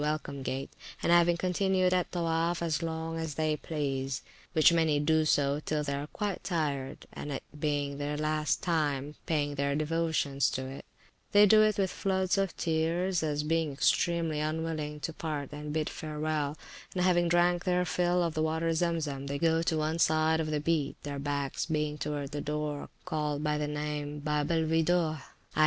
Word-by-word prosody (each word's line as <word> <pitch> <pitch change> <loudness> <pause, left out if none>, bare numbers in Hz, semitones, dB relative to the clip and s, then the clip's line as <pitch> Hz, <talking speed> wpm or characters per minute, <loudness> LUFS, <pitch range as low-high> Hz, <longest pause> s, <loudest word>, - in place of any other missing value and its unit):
Welcome 150 -2 -2
Gate, 135 +1 -3 0.3
and - - +2
having 175 0 +5
continued 185 +1 +2
at 180 -1 +1
Towoaf 170 0 0
as 165 -1 0
long 165 0 -3
as 160 -3 -3
they 155 0 +1
please, 135 -4 -3 0.3
which 160 0 +6
many 160 -3 +3
do 155 +1 +3
till 145 0 +2
they 150 -2 -1
are 140 +1 -3
quite 205 +3 -3
tired, 145 -6 -2
and 145 - -6
it 135 - -4 0.2
being 145 -1 -1
the 145 +1 -2
last 155 0 0
time 145 -5 0
of - - -11
their - - -29
paying 145 -3 +1
their 140 0 0
devotions 155 -3 +1
to 130 - -3
it, 135 +1 -8 0.5
they 205 0 +8
do 215 +1 +7
it 215 -1 +3
with 190 -2 +1
floods 190 0 0
of 195 -2 -1
tears, 170 +3 +1
as 150 -2 -1
being 160 0 +1
extremely 165 +2 +1
unwilling 155 -1 -2
to 165 - -3
part 150 -4 -4
and 150 0 -6
bid 155 0 0
farewell; 155 -1 -2 0.4
and 180 - +1
having 175 -1 +3
drank 175 +1 +3
their 180 -1 +2
fill 175 +1 +1
of 165 -2 -1
the 155 - -1
water 160 +1 +1
Zem 170 0 +1
Zem, 140 -2 -4
they 140 0 -2
go 165 +1 +2
to 165 -1 0
one 155 +2 -1
side 160 0 +3
of 155 -1 -1
the 150 -1 0
Beat, 150 -2 0
their 145 -1 -4
backs 140 0 -2
being 150 -2 -1
towards 145 -1 -3
the 145 -1 -3
door 150 0 -3 0.2
called 150 -4 -1
by 150 -1 0
the 150 - -1
name 150 0 -3
of 145 - -8
Babe 150 0 0
el 165 -1 +2
Weedoh 160 -1 +2 0.3
i. - - -1
155 Hz, 190 wpm, -30 LUFS, 145-165 Hz, 0.5 s, they